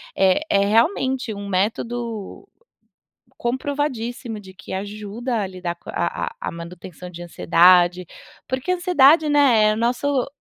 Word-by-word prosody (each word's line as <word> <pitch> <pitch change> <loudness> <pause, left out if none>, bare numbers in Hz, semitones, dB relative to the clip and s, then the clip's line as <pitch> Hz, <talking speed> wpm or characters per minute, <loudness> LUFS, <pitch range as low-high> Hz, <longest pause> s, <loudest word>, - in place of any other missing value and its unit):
Eh, 190 +7 +3
é 200 0 +3
realmente 250 - +1
um 200 0 -7
método 220 +2 -3 0.9
comprovadíssimo 245 -3 -3
de 190 -2 -13
que 190 - -10
ajuda 210 +4 -4
a 195 - -2
lidar 180 -2 -5
com - - -14
a - - -10 0.3
a 465 - -7
a - - -3
manutenção 175 +1 -9
de 175 0 -10
ansiedade. 175 +1 +4 0.4
Porque 260 +7 -2
a - - +2
ansiedade, 315 -3 +4
né, 265 -7 +4
é - - +2
o - - -4
nosso 250 +3 0
225 Hz, 145 wpm, -22 LUFS, 190-260 Hz, 0.9 s, ansiedade